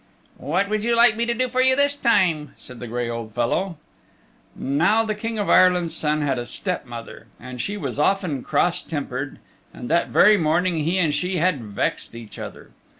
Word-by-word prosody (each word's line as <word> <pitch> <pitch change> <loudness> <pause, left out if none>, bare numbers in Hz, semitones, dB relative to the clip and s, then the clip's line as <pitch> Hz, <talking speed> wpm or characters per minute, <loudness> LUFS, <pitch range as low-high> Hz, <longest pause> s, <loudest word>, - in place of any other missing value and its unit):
"What 185 +7 0
would 215 0 -1
you 235 +1 +1
like 235 -1 +5
me 235 +1 -1
to 235 - +1
do 255 +2 0
for 255 +1 0
you 260 0 +4
this 285 +1 +2
time?" 165 - +1
said 125 -2 -12
the 120 - -7
gray 120 +1 -3
old 115 -2 -6
fellow. 165 +9 -1 0.8
Now 170 +11 +2
the 215 - -1
King's 195 -6 +2
Son 150 0 0
had 135 -3 0
a 120 - -4
step 180 -8 -4
mother, 115 -1 -9
and 125 0 -7
she 205 +1 -4
was 140 -7 -5
often 170 -4 +1
cross 175 +6 0
tempered, 140 -3 -5 0.3
and 120 - -8
that 170 +1 +2
very 210 +1 +5
morning 170 +1 +1
he 175 +4 +1
and 165 -5 +2
she 180 +5 -1
had 165 -6 +1
vexed 105 +2 -3
each 115 -2 -10
other. - - -9
170 Hz, 190 wpm, -22 LUFS, 130-205 Hz, 0.8 s, like